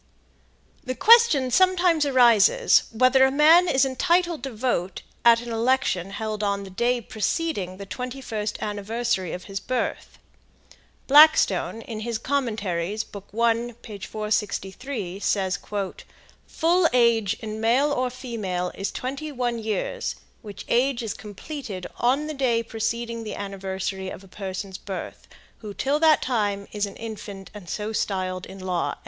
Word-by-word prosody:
The 255 Hz, -2 st, -4 dB
question 440 Hz, -, +6 dB
sometimes 355 Hz, -2 st, +3 dB
arises 255 Hz, -, +5 dB
whether 255 Hz, +3 st, +4 dB
it -, -, -1 dB
man 320 Hz, +5 st, +6 dB
is 270 Hz, -4 st, +3 dB
entitled 340 Hz, +4 st, +1 dB
to 270 Hz, +1 st, -5 dB
vote 215 Hz, -6 st, -2 dB, 0.2 s
at 235 Hz, -1 st, +6 dB
an 240 Hz, -1 st, -7 dB
election 230 Hz, -5 st, +1 dB
held 215 Hz, +1 st, -4 dB
on 200 Hz, -1 st, 0 dB
the 195 Hz, -, -10 dB
day 240 Hz, +5 st, +1 dB
preceding 215 Hz, -, -2 dB
the 200 Hz, -, -8 dB
twenty 250 Hz, +6 st, -6 dB
first 215 Hz, -5 st, -4 dB
anniversary 210 Hz, -2 st, -2 dB
of 180 Hz, -, -6 dB
his 195 Hz, -1 st, -5 dB
birth. 255 Hz, +4 st, -3 dB, 0.9 s
Blackstone, 295 Hz, -5 st, +5 dB
in 220 Hz, -2 st, -6 dB
his 230 Hz, +1 st, -3 dB
Commentaries, 215 Hz, -7 st, -2 dB
book 200 Hz, -2 st, -11 dB
1, 230 Hz, +1 st, 0 dB
page 205 Hz, -4 st, -8 dB
463, 210 Hz, -1 st, -3 dB
says: 190 Hz, -2 st, 0 dB, 0.9 s
"Full 335 Hz, +1 st, +2 dB
age 235 Hz, -4 st, +3 dB
in 220 Hz, -1 st, -6 dB
male 255 Hz, +6 st, +3 dB
or 255 Hz, -2 st, 0 dB
female 215 Hz, -8 st, -4 dB
is 195 Hz, -, -4 dB
21 255 Hz, -3 st, -3 dB
years, 220 Hz, -, -3 dB, 0.3 s
which 205 Hz, -3 st, -9 dB
age 250 Hz, 0 st, +1 dB
is 220 Hz, -, -3 dB
completed 210 Hz, -, -7 dB
on 265 Hz, +5 st, +2 dB
the 310 Hz, -, -4 dB
day 245 Hz, -5 st, +1 dB
preceding 230 Hz, +1 st, -3 dB
the 215 Hz, -, -5 dB
anniversary 190 Hz, -1 st, -4 dB
of 190 Hz, -, -9 dB
a -, -, -15 dB
person's 190 Hz, 0 st, -6 dB
birth, 195 Hz, -2 st, -7 dB, 0.3 s
who, 210 Hz, -3 st, -8 dB
till 285 Hz, +2 st, 0 dB
that 315 Hz, -2 st, +4 dB
time, 205 Hz, -5 st, -1 dB
is 205 Hz, -1 st, -1 dB
an 200 Hz, -, -10 dB
infant, 205 Hz, -3 st, -8 dB
and 200 Hz, -5 st, -10 dB
so 215 Hz, +1 st, -3 dB
styled 185 Hz, -3 st, -2 dB
in 190 Hz, -, -10 dB
law." 185 Hz, -2 st, -2 dB
225 Hz, 145 wpm, -24 LUFS, 200-260 Hz, 0.9 s, question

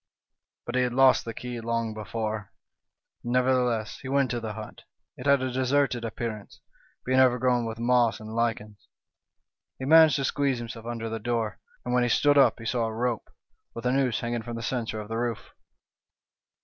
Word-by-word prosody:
" -, -, -64 dB
But 120 Hz, -, -5 dB
he 125 Hz, -, +2 dB
had 125 Hz, -1 st, 0 dB
lost 135 Hz, 0 st, +5 dB
the 115 Hz, -, -5 dB
key 125 Hz, -1 st, -6 dB
long 115 Hz, -1 st, -2 dB
before. 110 Hz, -1 st, -4 dB, 0.7 s
"Nevertheless, 125 Hz, -2 st, +1 dB
he 130 Hz, -, -9 dB
went 135 Hz, -1 st, +2 dB
to 120 Hz, -, -1 dB
the 110 Hz, -2 st, -5 dB
hut. 110 Hz, 0 st, -9 dB, 0.3 s
It 125 Hz, -, -6 dB
had 140 Hz, -2 st, +4 dB
a 130 Hz, -, -2 dB
deserted 130 Hz, -1 st, +1 dB
appearance, 110 Hz, -2 st, -5 dB, 0.5 s
being 130 Hz, +1 st, +2 dB
overgrown 125 Hz, -1 st, +3 dB
with 115 Hz, 0 st, -5 dB
moss 120 Hz, -1 st, +2 dB
and 110 Hz, 0 st, -8 dB
lichens. 110 Hz, -3 st, -2 dB, 0.5 s
" -, -, -60 dB
He 130 Hz, -, -5 dB
managed 160 Hz, +1 st, +7 dB
to 135 Hz, -, 0 dB
squeeze 140 Hz, -1 st, 0 dB
himself 115 Hz, -1 st, -7 dB
under 115 Hz, -1 st, -4 dB
the 115 Hz, 0 st, -4 dB
door, 115 Hz, -1 st, -2 dB, 0.3 s
and 125 Hz, -, -2 dB
when 125 Hz, -, +3 dB
he 120 Hz, -, +1 dB
stood 145 Hz, +4 st, +4 dB
up 135 Hz, -, +5 dB
he 115 Hz, -, -10 dB
saw 115 Hz, 0 st, 0 dB
a 110 Hz, -, -3 dB
rope, 120 Hz, -1 st, -2 dB, 0.5 s
with 115 Hz, -, -7 dB
a 125 Hz, -, +2 dB
noose 130 Hz, -3 st, +1 dB
hang 120 Hz, 0 st, -3 dB
ing 120 Hz, -, -2 dB
from 120 Hz, +1 st, -6 dB
the 115 Hz, -, -5 dB
centre 115 Hz, -3 st, -2 dB
of 105 Hz, -, -7 dB
the 115 Hz, +1 st, -3 dB
roof. 115 Hz, -4 st, -3 dB
120 Hz, 200 wpm, -27 LUFS, 115-125 Hz, 0.7 s, managed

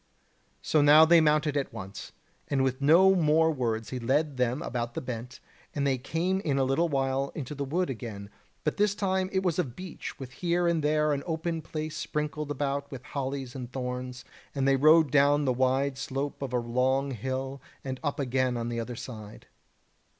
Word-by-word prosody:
So 155 Hz, -, +3 dB
now 150 Hz, +2 st, +8 dB
they 170 Hz, 0 st, +6 dB
mounted 150 Hz, -1 st, +2 dB
at 140 Hz, -2 st, -1 dB
once, 95 Hz, 0 st, -8 dB, 0.4 s
and 135 Hz, -2 st, +1 dB
with 130 Hz, +1 st, -1 dB
no 175 Hz, +7 st, +6 dB
more 160 Hz, -2 st, +3 dB
words 115 Hz, -6 st, -2 dB
he 130 Hz, -, -3 dB
led 140 Hz, +4 st, 0 dB
them 125 Hz, +2 st, 0 dB
about 120 Hz, -1 st, -3 dB
the -, -, -1 dB
bent, 125 Hz, +1 st, -6 dB, 0.4 s
and 140 Hz, -1 st, 0 dB
they 135 Hz, -2 st, +1 dB
came 170 Hz, +8 st, -1 dB
in 145 Hz, -8 st, -1 dB
a 135 Hz, -, +3 dB
little 135 Hz, +6 st, +1 dB
while 135 Hz, -1 st, 0 dB
into 150 Hz, -1 st, -5 dB
the 140 Hz, -1 st, -3 dB
wood 175 Hz, +7 st, 0 dB
again, 105 Hz, -4 st, -7 dB, 0.3 s
but 150 Hz, -, -1 dB
this 205 Hz, 0 st, +2 dB
time 190 Hz, -2 st, 0 dB
it 190 Hz, 0 st, 0 dB
was 180 Hz, -2 st, 0 dB
of 130 Hz, -9 st, -2 dB
beech, 185 Hz, 0 st, -7 dB
with 130 Hz, -2 st, -8 dB
here 175 Hz, +4 st, 0 dB
and 165 Hz, -3 st, +1 dB
there 150 Hz, 0 st, +2 dB
an 140 Hz, -, -2 dB
open 165 Hz, 0 st, -2 dB
place 155 Hz, 0 st, -5 dB
sprinkled 150 Hz, 0 st, -3 dB
about 140 Hz, 0 st, -2 dB
with 135 Hz, -3 st, -8 dB
hollies 135 Hz, -2 st, -4 dB
and 125 Hz, -3 st, -7 dB
thorns; 125 Hz, -1 st, -5 dB, 0.3 s
and 135 Hz, -1 st, +1 dB
they 135 Hz, -, +5 dB
rode 155 Hz, +1 st, +5 dB
down 145 Hz, +1 st, +4 dB
the 130 Hz, -, +2 dB
wide 130 Hz, +2 st, +1 dB
slope 135 Hz, +2 st, -4 dB
of 135 Hz, -2 st, -3 dB
a 125 Hz, -, +1 dB
long 130 Hz, +3 st, 0 dB
hill, 130 Hz, +3 st, -4 dB, 0.2 s
and 130 Hz, -1 st, -4 dB
up 145 Hz, 0 st, -2 dB
again 130 Hz, -2 st, 0 dB
on 115 Hz, 0 st, -3 dB
the 120 Hz, 0 st, -3 dB
other 120 Hz, +1 st, -4 dB
side. 110 Hz, -3 st, -9 dB
140 Hz, 195 wpm, -28 LUFS, 130-155 Hz, 0.4 s, now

